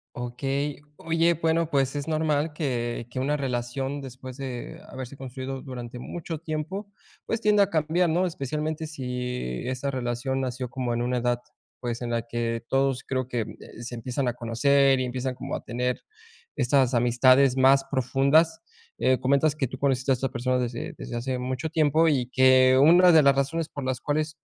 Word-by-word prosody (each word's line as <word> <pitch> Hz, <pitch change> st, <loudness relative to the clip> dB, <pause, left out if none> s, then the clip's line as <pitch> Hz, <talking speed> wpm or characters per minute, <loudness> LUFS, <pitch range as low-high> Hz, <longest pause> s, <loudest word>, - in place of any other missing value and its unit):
Okey. 135 Hz, +4 st, -3 dB, 0.2 s
Oye, 165 Hz, +1 st, +2 dB
bueno, 165 Hz, 0 st, 0 dB
pues, 135 Hz, -1 st, +1 dB
es 145 Hz, +1 st, -3 dB
normal 155 Hz, -1 st, 0 dB
que 120 Hz, -6 st, -2 dB
que 130 Hz, -, -5 dB
una 140 Hz, +3 st, +1 dB
relación 135 Hz, +1 st, -2 dB
después 130 Hz, -1 st, -9 dB
de 130 Hz, -3 st, -6 dB
haberse 130 Hz, +1 st, -8 dB
construido 130 Hz, 0 st, -6 dB
durante 125 Hz, -2 st, -7 dB
mucho 165 Hz, +5 st, -6 dB
tiempo, 160 Hz, +6 st, -4 dB, 0.4 s
pues, 225 Hz, -, -2 dB
tienda 210 Hz, -2 st, +5 dB
a 195 Hz, -, -1 dB
cambiar, 165 Hz, +2 st, +2 dB
¿no? 180 Hz, +3 st, +2 dB
Especialmente 155 Hz, +1 st, -3 dB
sÍ 125 Hz, -, -4 dB
esa 130 Hz, +2 st, -2 dB
relación 130 Hz, 0 st, -2 dB
nació 125 Hz, -1 st, -3 dB
como 120 Hz, -1 st, -2 dB
en 120 Hz, -, -1 dB
una 125 Hz, +1 st, 0 dB
edad, 120 Hz, 0 st, 0 dB, 0.4 s
pues, 120 Hz, 0 st, -4 dB
en 120 Hz, -, -3 dB
la 115 Hz, -1 st, 0 dB
que 115 Hz, -1 st, -2 dB
todos 135 Hz, -1 st, +1 dB
creo 130 Hz, -2 st, -2 dB
que, 120 Hz, -2 st, -2 dB
eh, 110 Hz, +1 st, -9 dB
se 120 Hz, +1 st, -6 dB
empiezan 125 Hz, +3 st, -2 dB
a 120 Hz, -, 0 dB
conocer 135 Hz, +3 st, +3 dB
y 130 Hz, -, 0 dB
empiezan 130 Hz, +1 st, -3 dB
como -, -, -5 dB
a -, -, -6 dB
tener 125 Hz, +1 st, -2 dB, 0.5 s
estas 130 Hz, 0 st, +2 dB
amistades 130 Hz, +2 st, +4 dB
más 135 Hz, +1 st, +5 dB
profundas. 140 Hz, +5 st, +2 dB, 0.4 s
Eh, 130 Hz, 0 st, +3 dB
comentas 140 Hz, +3 st, +2 dB
que 140 Hz, -, 0 dB
tú 130 Hz, +2 st, -9 dB
conociste 135 Hz, -1 st, +1 dB
a -, -, +6 dB
estas 130 Hz, +1 st, -1 dB
personas 125 Hz, +2 st, 0 dB
desde 120 Hz, -1 st, -4 dB
desde 120 Hz, -, -7 dB
hace 125 Hz, +1 st, -2 dB
mucho 130 Hz, +4 st, -3 dB
tiempo 160 Hz, +1 st, +3 dB
y 130 Hz, -6 st, +1 dB
que 130 Hz, 0 st, +5 dB
una 175 Hz, +5 st, +7 dB
de 160 Hz, -2 st, +7 dB
las 140 Hz, 0 st, +5 dB
razones 150 Hz, +4 st, -1 dB
por 140 Hz, -, -7 dB
las 130 Hz, -1 st, -2 dB
cuales 150 Hz, +1 st, -2 dB
130 Hz, 180 wpm, -26 LUFS, 125-150 Hz, 0.5 s, una